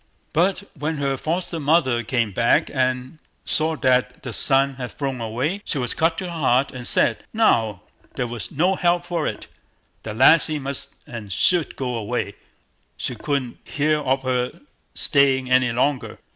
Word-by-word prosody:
But 185 +4 +2
when 150 +1 -3
her 140 -1 0
foster 165 +4 -2
mother 140 -5 +2
came 115 -2 -1
back 115 +5 +2
and 130 +2 -1 0.3
saw 160 +1 +1
that 125 -2 +1
the 130 - -5
sun 135 +1 +3
had 125 -2 -5
flown 135 -4 -3
away, 130 - -2
she 150 - -3
was 125 -3 -1
cut 165 +1 +1
to - - -3
the 180 - -5
heart, 135 -5 +1
and 125 -1 -4
said, 110 -3 +3
"Now, 115 - +2 0.3
there 125 - -1
was 115 -7 -5
no 180 +6 +1
help 175 -1 +1
for 170 -3 -2
it, - - -5 0.6
the 110 -1 -6
lassie 155 +5 +5
must 140 -1 -5
and 110 -4 -8
should 170 - +2
go 125 -2 -3
away; 110 -3 -3 0.6
she - - -3
couldn't 130 +1 -3
hear 150 +1 0
of 135 -2 0
her 125 -1 -2 0.3
staying 135 -3 +3
any 130 -2 +4
longer." 130 +3 -1
135 Hz, 165 wpm, -22 LUFS, 125-155 Hz, 0.6 s, lassie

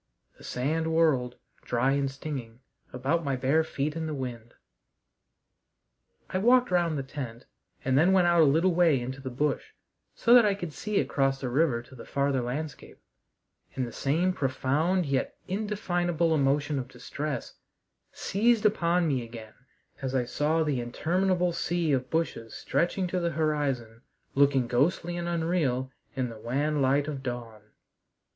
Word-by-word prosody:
The - - -14
sand 155 +6 -1
whirled, 145 -7 +2 0.3
dry 125 +2 +1
and 140 0 +1
stinging, 135 -4 -7 0.3
about 140 +7 0
my 140 -2 0
bare 135 +5 +2
feet 150 -1 -3
in 160 -1 -3
the 155 - -3
wind. 120 -3 -6 1.8
I 185 - 0
walked 245 +3 +4
round 170 -3 +2
the 135 - -2
tent 130 -4 -7 0.4
and 130 0 +2
then 165 +7 +5
went 190 -2 +4
out 170 -1 +5
a - - +7
little 165 +6 +3
way 165 -5 +4
into 130 +2 -5
the 130 - -5
bush, 145 - -2 0.4
so 235 - +4
that 245 -1 +9
I 205 -2 +2
could 175 -6 -6
see 210 +5 -1
across 135 -1 +1
the 130 - -3
river 130 -3 +1
to 125 - -18
the 125 - -10
farther 140 -2 0
landscape, 140 +5 -5 0.8
and 130 - -1
the 120 - -7
same 165 +10 +1
profound 150 +6 0
yet 135 -2 -1
indefinable 175 -5 0
emotion 145 0 +1
of 125 - -5
distress 140 +2 -5 0.5
seized 225 +2 +1
upon 175 -4 +2
me 135 -4 +1
again 115 -2 -10 0.5
as 135 -1 -2
I 125 -2 +1
saw 155 +6 +1
the 145 -5 0
interminable 180 +8 0
sea 170 -1 0
of 130 -2 0
bushes 160 -8 -2
stretching 180 +2 0
to 180 - 0
the 170 -1 0
horizon, 140 -7 -1 0.3
looking 140 -2 +4
ghostly 160 +8 +1
and 175 0 -3
unreal 160 -7 0 0.2
in 130 -2 -1
the 115 -1 -10
wan 145 +6 0
light 140 +2 +2
of 145 -3 -4
dawn. 120 -4 -6
145 Hz, 160 wpm, -28 LUFS, 130-170 Hz, 1.8 s, that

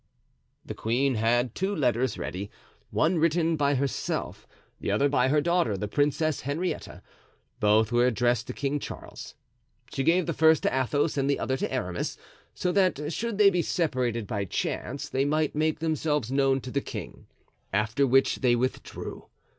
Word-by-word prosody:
The - - -5
queen 130 +5 0
had 120 +1 +1
two 195 +2 -1
letters 125 - +1
ready, 100 +3 -5 0.4
one 170 +2 +1
written 165 0 +2
by 145 -1 +2
herself, 135 0 -3 0.3
the - - -3
other 140 - +3
by 130 -3 +2
her 150 +2 +3
daughter, 170 - +1
the 105 - -3
Princess 145 +4 0
Henrietta. 155 +7 -4 0.6
Both 110 +1 +3
were 120 +1 +4
addressed 120 0 +1
to - - -4
King 145 +1 -1
Charles. - - -9 0.6
She - - -1
gave 170 +4 +3
the 165 - -1
first 160 0 +4
to - - +1
Athos 145 +4 0
and 135 0 +1
the 140 - +2
other 130 - -1
to - - -3
Aramis, 90 -9 -3 0.4
so 180 - 0
that 175 -6 +1
should 230 +1 -3
they 205 -1 +6
be 180 -2 +1
separated 125 - -1
by 100 -2 -2
chance 135 +8 -3
they 135 - 0
might 155 +1 +1
make 155 +1 +1
themselves 150 -5 -1
known 135 -1 +2
to 125 - -7
the 140 - 0
king; - - -8 0.4
after 110 +7 +1
which 135 +1 +3
they 125 -2 +3
withdrew. 130 +2 -4
140 Hz, 170 wpm, -27 LUFS, 120-155 Hz, 0.6 s, they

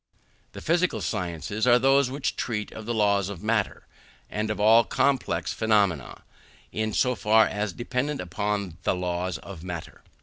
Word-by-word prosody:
The - - -8
physical 175 +2 +1
sciences 90 +3 -2
are 120 0 +7
those 135 +1 +4
which 140 +2 -2
treat 105 -3 -3
of 110 0 -9
the 120 - -1
laws 100 -3 +2
of 100 -1 -8
matter, 110 -2 -1 0.5
and 105 +1 -2
of 105 - -2
all 110 +3 +6
complex 115 -9 0
phenomena 100 - +1 0.5
in 110 0 -2
so 125 +4 +2
far 110 -1 +4
as 105 -1 -2
dependent 125 +7 -2
upon 100 0 -3
the - - +1
laws 90 -1 -2
of 85 +3 -10
matter. 90 -3 -7
105 Hz, 160 wpm, -26 LUFS, 90-120 Hz, 0.5 s, are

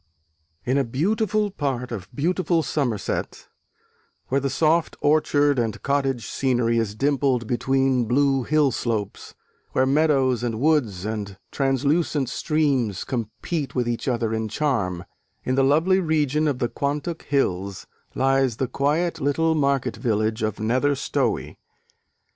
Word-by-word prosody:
In 130 +3 +2
a - - +2
beautiful 205 - 0
part 130 -7 -3
of 100 -4 -6
beautiful 170 +4 0
Somerset, 125 -10 -2 0.8
where 140 +1 +1
the 140 - -1
"soft 160 +4 +1
orchard 145 -2 +3
and 115 -2 -1
cottage 135 -5 0
scenery" 120 -2 +1
is 105 -2 -2
dimpled 135 -2 +1
between 130 +1 +1
blue 135 +2 +2
hillslopes, 125 -8 -1 0.4
where 130 - +3
meadows 135 -3 +2
and 115 -2 -2
woods 125 - +1
and 105 -3 -4
translucent 140 +1 +1
streams 140 - 0
compete 130 - -4
with 125 -2 0
each 120 +2 -3
other 115 -3 0
in 110 0 -1
charm, 105 - -1 0.4
in 130 - -1
the 135 - +3
lovely 160 +8 +3
region 155 -3 +1
of 140 -4 0
the 120 - 0
Quantock 145 +6 -3
hills, 100 -9 -1 0.3
lies 135 -3 +2
the 130 - -1
quiet 160 +6 0
little 160 +4 +2
market 140 -3 0
village 110 -2 0
of 110 -2 -2
Nether 130 +6 +1
Stowey. - - -2
135 Hz, 130 wpm, -23 LUFS, 115-150 Hz, 0.8 s, orchard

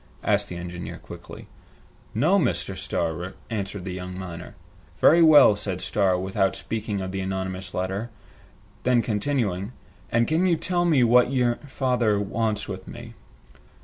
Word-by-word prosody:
asked 100 -1 +1
the 90 - -6
engineer 85 0 -6
quickly. - - -11 0.7
"No, 165 - +4
Mr. 120 - -1
Starr," 90 -1 -3 0.2
answered 100 -3 -4
the 95 - -4
young 90 0 -6
miner. 90 -3 -8 0.4
"Very 170 +2 +6
well," 150 -9 +8
said 100 -3 -4
Starr, 95 -2 +1
without 95 +1 0
speaking 105 -3 -3
of 95 0 -4
the 95 - -3
anonymous 95 0 -4
letter. 95 +5 -2 0.7
Then, 125 -2 +3
continuing, 105 -3 -1 0.4
"And 115 0 +2
can 165 +4 +2
you 175 - +3
tell 175 +1 0
me 150 -7 +4
what 120 +1 +5
you 125 -3 +2
father 125 -6 +1
wants 105 +1 -1
with 95 -2 -7
me?" - - -9
105 Hz, 145 wpm, -25 LUFS, 95-125 Hz, 0.7 s, well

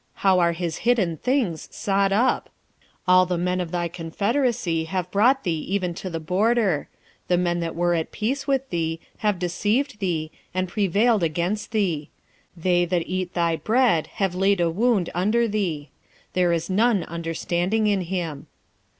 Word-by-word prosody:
how 190 -1 +5
are 170 -1 +3
his 170 -1 -3
hidden 220 -9 +1
things 235 - -1
sought 195 0 +1
up! 225 +6 +2 0.3
1:7 - - -31 0.2
All 185 0 +7
the 180 -1 -1
men 180 +1 0
of 175 - -4
thy 175 0 -1
confederacy 180 - -1
have 180 +1 -3
brought 250 +7 +3
thee 165 -4 -1
even 185 -3 0
to 185 +2 -6
the 165 -2 -4
border: 190 0 +1 0.4
the 180 - +3
men 175 -1 0
that 165 -1 -3
were 175 +1 +1
at 165 -2 -1
peace 270 +6 -2
with 270 -1 +1
thee 165 -1 -1 0.2
have 210 -3 +1
deceived 210 +8 -1
thee, 165 -5 -2 0.2
and 185 0 0
prevailed 205 +3 +2
against 170 +6 -1
thee; 180 -9 -1 0.5
that 165 - -14 0.3
they 180 -1 +2
eat 185 -1 -3
thy 170 -1 +2
bread 215 - +2
have 195 -3 0
laid 195 +1 +2
a 170 -1 +2
wound 210 -1 +1
under 215 +7 +2
thee: 175 -10 -2 0.4
there 180 -1 +2
is 170 0 -1
none 210 +1 +2
understanding 170 +5 -1
in 200 -2 +2
him. 170 -5 -4
185 Hz, 165 wpm, -24 LUFS, 170-210 Hz, 0.5 s, All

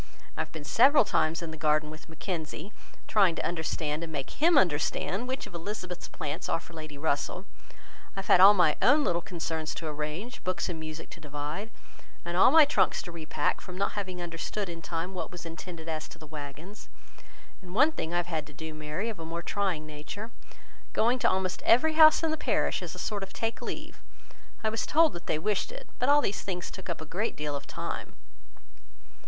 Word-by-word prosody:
I - - -1
have - - -5
been 160 -2 -7
several 265 - +6
times 160 +2 +1
in 165 - -5
the 160 - -7
garden 155 0 +2
with 155 +1 -12
Mackenzie, 160 +2 -5 0.3
trying 195 -6 +4
to - - -2
understand, 160 -2 -2
and 165 - -6
make 140 -3 -4
him 330 +1 +4
understand, 185 - +1
which 260 +1 -3
of - - -13
Elizabeth's 180 0 -5
plants 145 - -4
are 165 - +1
for 170 - -15
Lady 155 -2 -8
Russell. 150 +5 -1 0.7
I 195 - -2
have - - -13
had - - +6
all 200 +2 +10
my 170 -5 +4
own 295 +1 +6
little 170 -8 +1
concerns 160 -2 -3
to 165 - -5
arrange, 155 - -4
books 185 0 -1
and 165 -2 -4
music 155 0 -7
to - - -10
divide, 150 +7 -5 0.6
and 175 0 -3
all 180 - +7
my 315 -1 +8
trunks 285 - +2
to 175 - -8
repack, 155 -3 -1
from 180 0 -9
not 200 - +1
having 185 -3 -4
understood 175 +3 -3
in 170 -1 -7
time 170 +3 -3
what 175 -3 -4
was 180 -1 -8
intended 165 0 -8
as 155 -1 -3
to - - -11
the 160 - -11
waggons: 150 +6 -9 0.7
and 180 0 -10
one 290 +7 +6
thing 170 - -4
I 175 - +1
have 175 - +1
had 160 -4 -3
to 145 - -13
do, 160 +2 -7
Mary, 155 +7 -3
of 220 -6 -5
a - - -5
more 165 +1 -4
trying 185 -7 -1
nature: 155 +9 -7 0.6
going 240 +3 +3
to - - +4
almost 185 -1 -1
every 315 +7 +5
house 310 0 +8
in 320 - +2
the 315 - -1
parish, - - +1
as - - -6
a - - -9
sort 205 -2 -2
of 195 0 -6
take 225 0 -2
leave. - - -6 0.6
I 220 - +2
was 225 +1 -2
told 320 0 +5
that 175 - -9
they - - +1
wished 205 - 0
it. - - -9
But 250 - +2
all 290 +1 +7
these 200 - -1
things 180 -2 -4
took 190 -1 -8
up 170 - -3
a - - -5
great 195 +8 -2
deal 150 -1 -3
of 140 0 -6
time." - - -5
175 Hz, 215 wpm, -29 LUFS, 155-205 Hz, 0.7 s, all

